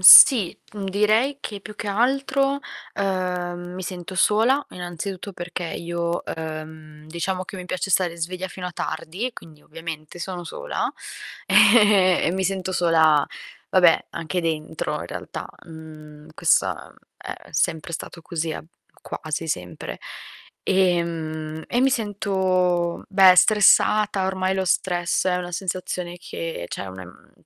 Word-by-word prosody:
sì, 195 +1 +9
uhm, 200 -2 -5
direi 215 +8 +2
che 205 -6 -6
più 210 +1 -10
che 205 - -5
altro, 275 +5 +1 0.4
ehm, 180 -2 -2
mi 185 - -6
sento 180 0 -6
sola, 225 +9 +3
innanzitutto 180 +2 -6
perché 175 0 -5
io, 170 0 -3
ehm, 155 -1 -7
diciamo 180 +3 -3
che 190 - -9
mi 180 - -7
piace 185 +2 -3
stare 175 -2 +2
sveglia 180 +3 -4
fino 180 0 -6
a 180 - -6
tardi, 165 +7 -4
e 255 - -5
quindi 155 -2 -13
ovviamente 160 0 -8
sono 180 0 -5
sola - - -3 0.6
ehm 205 -4 +6
e - - 0
mi 190 +1 -1
sento 190 0 -1
sola, 160 -4 +4 0.4
vabbè, 175 -3 +5
anche 170 +2 -3
dentro 160 -1 -2
in - - -6
realtà. - - -6 0.2
Mhmm, 155 -2 -12
questa - - +1 0.2
è - - -7 0.2
sempre 160 0 -1
stato 170 +1 -7
così, 165 -1 -3
a - - -7 0.4
quasi 155 +1 -4
sempre. 90 -9 -4 0.7
Ehm, 165 -4 0
e 245 - 0
mi 265 - +5
sento, 190 -6 0
beh, 190 -2 +7
stressata. 210 -1 +5
Ormai 190 0 0
lo 190 0 0
stress 175 0 +1
è 180 - +2
una 180 -1 -4
sensazione 180 -1 -3
che 165 - -5
cioè - - -5
una 95 0 -8
m 90 - -17
180 Hz, 140 wpm, -23 LUFS, 165-195 Hz, 0.7 s, sì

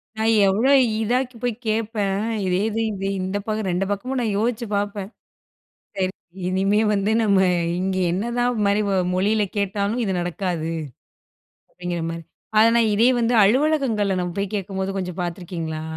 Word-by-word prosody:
நான் 220 +1 +2
எவ்ளோ 215 +7 +2 0.3
இதா 245 +3 0
போய் 245 -2 +1
கேட்பேன். 210 -2 0 0.2
இதே 185 +1 +1
இது, 220 +1 -2
இது 195 -1 -3
இந்த 190 +2 -2
பக்கம் 215 -2 -1
2 185 +3 0
பக்கமும் 255 +6 -2
நான் 215 -4 -1
யோசிச்சு 235 +1 -1
பார்ப்பேன். 200 -1 -2 1.2
சரி 190 - -13
இனிமே 195 +3 +2
வந்து, 200 +1 +1
நம்ம 200 -3 +3 0.4
இங்க 190 0 -1 0.2
என்னதான் 240 +4 0
மாரி 200 +1 +2 0.3
மொழியில 210 +3 +2
கேட்டாலும் 205 +3 -1
இது 195 - -1
நடக்காது. 175 -2 -2 1.0
அப்பிடிங்கிற 175 -2 -5
மாரி. 165 0 -6 0.3
ஆனா, 220 +1 +7
நான் 230 -2 +3
இதே 230 +4 +4
வந்து 235 +1 +1
அலுவலகங்கள்ல 230 -4 +2
நம்ம 180 -1 -3
போய் 200 +1 -2
கேட்கும்போது 195 -1 -3
கொஞ்சம் 180 -1 -5
பார்த்துருக்கீங்களா? 170 -2 -4
200 Hz, 145 wpm, -22 LUFS, 190-225 Hz, 1.2 s, ஆனா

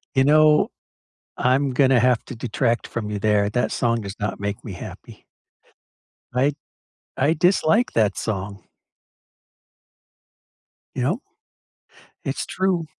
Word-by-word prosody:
You 130 - +5
know, 150 +1 +5 0.7
I'm 130 +2 +2
gonna 130 -1 +4
have 125 -1 +2
to 130 - -8
detract 115 0 -1
from 110 -3 -4
you 105 -1 -3
there, 105 -1 +2
that 120 +2 0
song 115 -1 0
does 100 -1 -7
not 105 -1 -3
make 100 0 -4
me 105 - -7
happy. 90 - -10 1.1
I 135 +3 +2 0.6
I 140 +4 +2
dislike 180 +7 +2
that 105 -3 +2
song. 100 -1 -4 2.3
You 125 - -1
know? 180 - 0 1.0
It's - - -2
true. 185 -3 0
125 Hz, 120 wpm, -22 LUFS, 105-145 Hz, 2.3 s, You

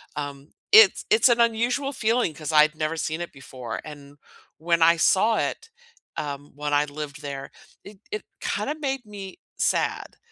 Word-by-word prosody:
Um, 145 0 -6 0.2
it's 440 +1 +7
it's 430 -6 +5
an 235 0 +3
unusual 240 +4 +1
feeling 230 - +1
'cause 155 0 -5
I'd 155 +1 +5
never 155 +1 -2
seen 160 +1 -2
it 175 - -5
before. 130 -3 -7
And 145 -1 -11 0.4
when 170 +1 0
I 165 +1 +6
saw 215 +6 +3
it, 455 - -3 0.5
um, 145 -1 -5
when 145 0 -3
I 145 0 +3
lived 145 0 -7
there, 140 -1 -6 0.3
it 200 -1 -13
it 425 0 -4 0.2
kinda 300 - -2
made 270 -4 -3
me 200 -3 -9 0.2
sad. - - -1
160 Hz, 165 wpm, -24 LUFS, 145-230 Hz, 0.5 s, it's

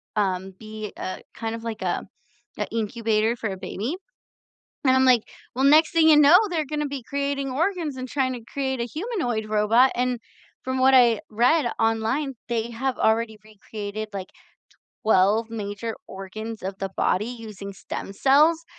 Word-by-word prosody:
um, 190 -2 0
be 215 -1 -7
a 185 - -5
kind 225 0 -4
of 230 - -8
like 225 -3 -5
a 180 -2 -1 0.5
an 210 - -2
incubator 225 0 0
for 220 -3 -3
a 190 - -5
baby, 230 - -4 0.9
and 260 -1 +5
I'm 260 - +4
like, 250 -4 +5 0.3
"Well, 265 +2 0
next 305 +3 +6
thing 325 -1 +5
you 310 - +8
know, 300 +4 +8
they're 325 -3 0
gonna 300 +1 -2
be 275 -2 -5
creating 280 +1 -2
organs 325 0 -1
and 255 0 -5
trying 265 -1 0
to 240 -2 -8
create 265 -2 -2
a - - 0
humanoid 275 - -3
robot," 215 +5 +4
and 250 -1 -1 0.4
from 260 0 -2
what 265 +1 +5
I 240 -4 +6
read 240 +5 +3
online, 225 +6 0
they 235 -1 -1
have 260 +3 -2
already 220 0 +1
recreated, 215 0 -7
like, 190 -2 -5 0.7
12 215 +2 +3
major 215 0 -4
organs 215 +4 -7
of 190 +1 -4
the 195 -1 -3
body 205 +4 +1
using 215 -5 -8
stem 195 - -7
cells, 300 +9 +4
230 Hz, 165 wpm, -24 LUFS, 215-270 Hz, 0.9 s, you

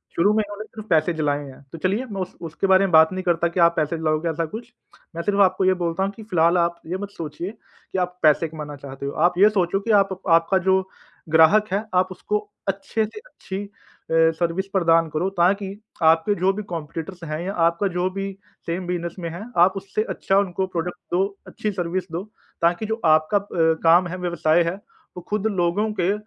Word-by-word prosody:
शुरू 205 +5 +3
में 215 0 +2
उन्होंने 205 +1 -7
सिर्फ 215 -1 -11
पैसे 160 +1 +3
जलाए 145 -2 -1
हैं। 135 -1 -12
तो - - -8
चलिए 200 +7 0
मैं 195 -2 -3
उस 185 - -6
उसके 165 +5 -2
बारे 190 +1 +5
में 190 - -2
बात 160 -1 +6
नहीं 185 0 -4
करता 170 -2 +2
कि 170 +2 -3
आप 170 0 +5
पैसे 155 +1 0
जलाओगे 155 +1 0
ऐसा 165 +1 -1
कुछ 225 +9 -8 0.4
मैं 170 - -2
सिर्फ़ 205 +1 0
आपको 190 0 +3
ये 185 - +5
बोलता 170 +2 0
हूँ 195 - -1
कि 220 +2 -12
फिलहाल 175 -4 +2
आप 170 0 +1
ये 175 +3 -3
मत 200 +1 -6
सोचिए 170 0 -6
कि 215 -3 -11
आप 180 0 -2
पैसे 155 +2 +4
कमाना 150 -2 -7
चाहते 140 -1 -8
हो। 140 - -2 0.2
आप 180 - -2
ये 205 +3 +7
सोचो 195 -2 0
कि - - +3
आप 195 - -14 0.2
आपका 165 +3 +4
जो 190 0 +4 0.5
ग्राहक 165 +7 +5
है 200 +2 0
आप 180 0 +4
उसको 210 +3 -2 0.3
अच्छे 195 +3 -1
से 220 - -10
अच्छी 205 - -7 0.5
अ, 165 0 +5
सर्विस 175 +3 -1
प्रदान 165 -3 +3
करो 155 +5 -1
ताकि 195 +3 +2 0.3
आपके 165 +6 +4
जो 185 +1 +2
भी 210 +2 -5
कॉम्पिटिटर्स 165 +2 -6
हैं 155 -1 -4
या 195 - -3
आपका 170 +4 +1
जो 180 +1 +1
भी 195 +1 -4 0.3
सेम 175 +2 -3
बिजनेस 175 -1 -3
में 170 -2 -4
है 170 +5 -7 0.2
आप 190 - 0
उससे 195 +2 -2
अच्छा 195 - +1
उनको 190 -1 -1
प्रोडक्ट 175 -1 -4 0.2
दो, 195 +2 0
अच्छी 215 - -3
सर्विस 180 -1 -3
दो 170 +3 -3 0.4
ताकि 175 +5 +2
जो 220 +1 -2
आपका 155 +5 +4
प 175 - -3 0.2
काम 170 +2 +5
है, 180 +2 -5
व्यवसाय 170 -2 +2
है 170 +2 -2 0.4
वो - - -5
खुद 210 0 0
लोगों 200 +2 0
के 180 +3 +2
180 Hz, 215 wpm, -23 LUFS, 165-195 Hz, 0.5 s, ये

